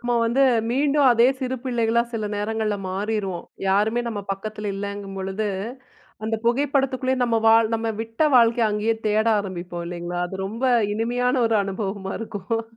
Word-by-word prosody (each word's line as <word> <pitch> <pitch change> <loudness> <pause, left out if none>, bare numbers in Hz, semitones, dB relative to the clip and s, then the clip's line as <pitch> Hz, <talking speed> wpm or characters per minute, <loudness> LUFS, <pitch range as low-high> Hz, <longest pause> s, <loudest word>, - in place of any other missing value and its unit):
நம்ம 240 0 -1
வந்து 245 +4 +2 0.3
மீண்டும் 285 +2 +3
அதே 235 +1 +5
சிறு 260 -1 -2
பிள்ளைகளா 235 -2 +1
சில 220 -2 -2
நேரங்கள்ல 215 0 -1
மாறிருவோம். 195 -1 -2 0.2
யாருமே 210 +5 +2
நம்ம 210 -3 -3
பக்கத்தில 210 +1 -5
இல்லங்கும்பொழுது, 195 0 -4 0.8
அந்த 225 0 -1
புகைப்படத்துக்குள்ளயே 260 0 +1
நம்ம 235 -1 +1
வாழ் 225 0 +5
நம்ம 225 0 -1
விட்ட 225 +7 0
வாழ்க்கைய, 230 -1 +4
அங்கயே 210 +2 0
தேட 215 +2 +2
ஆரம்பிப்போம், 175 -3 -5
இல்லைஙகளா? 175 0 -4
அது 190 - -7
ரொம்ப 230 +6 -4 0.3
இனிமையான 245 +3 0
ஒரு 225 -1 +2
அனுபவமா 195 0 -4
இருக்கும். 225 +1 -3
220 Hz, 140 wpm, -23 LUFS, 200-235 Hz, 0.8 s, அதே